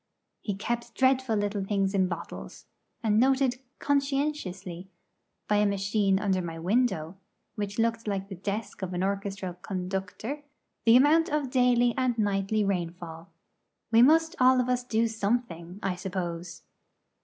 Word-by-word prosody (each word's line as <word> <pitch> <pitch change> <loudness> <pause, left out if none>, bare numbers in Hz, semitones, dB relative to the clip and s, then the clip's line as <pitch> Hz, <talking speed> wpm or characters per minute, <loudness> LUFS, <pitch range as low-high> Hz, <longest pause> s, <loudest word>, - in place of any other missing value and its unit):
He 205 - -3
kept 235 +3 -3
dreadful 260 -3 +2
little 205 -1 -1
things 195 0 0
in 190 -2 +3
bottles, 175 -2 -7 0.4
and 215 -1 +3
noted 260 0 +3 0.2
conscientiously, 275 - -2 0.6
by 210 - +3
a 210 0 +4
machine 200 0 +1
under 195 -2 +1
my 165 -2 -5
window 185 -2 0 0.4
which 205 -1 -4
looked 230 -1 0
like 195 -1 -2
the 200 - -7
desk 200 +4 -4
of 185 -1 -3
an 180 - -1
orchestral 195 -1 -2
conductor 190 +7 -4 0.4
the 230 0 +7
amount 300 +6 +5
of 290 -4 -1
daily 245 -2 +3
and 250 -2 +1
nightly 205 0 +1
rainfall. 170 -3 -4 0.6
We 230 0 +6
must 320 +5 +5
all 255 0 +6
of 250 0 0
us 250 0 +1
do 230 -2 +1
something, 205 -5 -2
I 195 -1 0
suppose. 175 -2 -5
205 Hz, 145 wpm, -28 LUFS, 190-245 Hz, 0.6 s, the